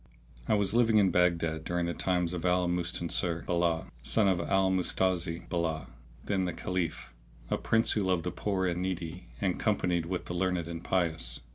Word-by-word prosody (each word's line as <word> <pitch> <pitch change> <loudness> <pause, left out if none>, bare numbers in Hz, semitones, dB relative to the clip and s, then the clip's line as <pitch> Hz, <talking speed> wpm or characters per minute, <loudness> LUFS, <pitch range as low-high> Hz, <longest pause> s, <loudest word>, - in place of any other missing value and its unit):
I - - +3
was 100 -1 +1
living 115 -2 +4
in 100 -3 +5
Baghdad 85 -3 +2
during 85 0 -1
the 85 - -1
times 90 -2 0
of 85 - -4
Al 90 0 +2
Mustansir 85 -1 -1
bi'llah,[FN#632] 85 -2 0
Son 105 - +2
of 95 -3 +2
Al 95 +2 +2
Mustazi 90 -2 0
bi'llah 85 -3 -2 0.4
the 100 - 0
then 90 -2 -1
Caliph, 85 -9 -3 0.4
a - - +2
prince 115 0 +2
who 105 - +1
loved 90 -3 +1
the 90 - -2
poor 95 -2 -1
and 90 -1 -1
needy 90 -1 -4
and 95 -3 0
companied 90 -6 +1
with 90 0 -3
the - - -5
learned 90 -1 0
and 85 0 -6
pious. 80 -9 0
90 Hz, 180 wpm, -30 LUFS, 85-95 Hz, 0.4 s, in